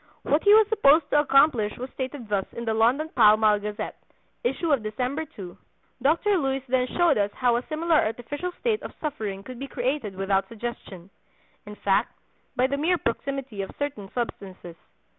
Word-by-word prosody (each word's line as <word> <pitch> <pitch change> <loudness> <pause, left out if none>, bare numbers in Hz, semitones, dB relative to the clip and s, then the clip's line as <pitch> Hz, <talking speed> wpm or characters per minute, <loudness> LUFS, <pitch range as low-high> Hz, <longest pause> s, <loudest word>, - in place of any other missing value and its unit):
What 295 - +1
he 410 - +6
was 435 -1 +6
supposed 315 -7 +4
to 295 - +5
accomplish 275 -7 +3
was 255 +2 -6
stated 260 -2 -6
thus 200 -2 -1
in 235 - -6
the 225 - 0
London 245 +8 +2
Pall 215 -7 +5
Mall 215 -1 +3
Gazette, 210 0 -6 0.4
issue 270 +7 -1
of 275 -5 +3
December 250 +8 -3
2: 180 -3 -8 0.5
"Dr. 335 +8 +2
Luys 270 -2 -1
then 250 0 +1
showed 340 -9 +4
us 200 0 +1
how 245 -2 +2
a 240 - -3
similar 325 +1 +1
artificial 265 +10 -2
state 450 -3 0
of - - -9
suffering 215 -10 -4
could 255 +1 -9
be 275 - -5
created 250 -5 -2
without 195 0 0
suggestion—in 210 -2 -10
fact, 195 -1 0 0.4
by 250 - +2
the 280 +2 -1
mere 340 +5 +2
proximity 270 -4 -3
of 195 - -5
certain 270 -9 -4
substances. 190 -7 -5
250 Hz, 175 wpm, -25 LUFS, 210-290 Hz, 0.5 s, he